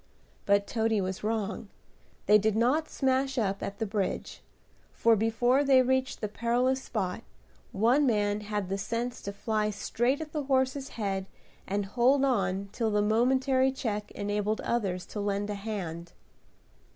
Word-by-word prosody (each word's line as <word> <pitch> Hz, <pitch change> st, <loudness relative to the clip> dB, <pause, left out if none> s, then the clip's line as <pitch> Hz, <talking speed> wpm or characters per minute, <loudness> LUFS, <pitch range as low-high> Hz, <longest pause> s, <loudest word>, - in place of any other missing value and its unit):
But 200 Hz, 0 st, +4 dB
Toady 225 Hz, -1 st, 0 dB
was 190 Hz, 0 st, -3 dB
wrong, 215 Hz, -1 st, -2 dB, 0.6 s
they 210 Hz, +1 st, +6 dB
did 215 Hz, 0 st, +1 dB
not 265 Hz, +8 st, +2 dB
smash 265 Hz, 0 st, 0 dB
up 200 Hz, -4 st, 0 dB
at 200 Hz, -, -5 dB
the 225 Hz, -, -1 dB
bridge; 200 Hz, -2 st, -3 dB, 0.5 s
for, 230 Hz, 0 st, +3 dB
before 235 Hz, +5 st, +2 dB
they 265 Hz, -2 st, +5 dB
reached 260 Hz, 0 st, 0 dB
the 210 Hz, -, -1 dB
perilous 245 Hz, +5 st, 0 dB
spot, 195 Hz, -4 st, -3 dB, 0.5 s
one 245 Hz, +8 st, +3 dB
man 205 Hz, -3 st, +1 dB
had 210 Hz, -2 st, -3 dB
the 195 Hz, +1 st, -2 dB
sense 235 Hz, +4 st, -3 dB
to 200 Hz, -, -5 dB
fly 215 Hz, +1 st, -1 dB
straight 240 Hz, +6 st, 0 dB
at 315 Hz, -1 st, -6 dB
the 300 Hz, -3 st, -3 dB
horse's 265 Hz, 0 st, 0 dB
head 195 Hz, -3 st, -2 dB, 0.4 s
and 200 Hz, +1 st, -1 dB
hold 255 Hz, +6 st, +3 dB
on 200 Hz, -6 st, 0 dB
till 230 Hz, -2 st, -1 dB
the 210 Hz, -1 st, +2 dB
momentary 260 Hz, +4 st, +3 dB
check 210 Hz, -5 st, -3 dB
enabled 205 Hz, +1 st, -1 dB
others 190 Hz, -7 st, -1 dB
to 210 Hz, -, -7 dB
lend 205 Hz, 0 st, -1 dB
a -, -, -1 dB
hand. 185 Hz, -5 st, -5 dB
220 Hz, 155 wpm, -29 LUFS, 200-255 Hz, 0.6 s, they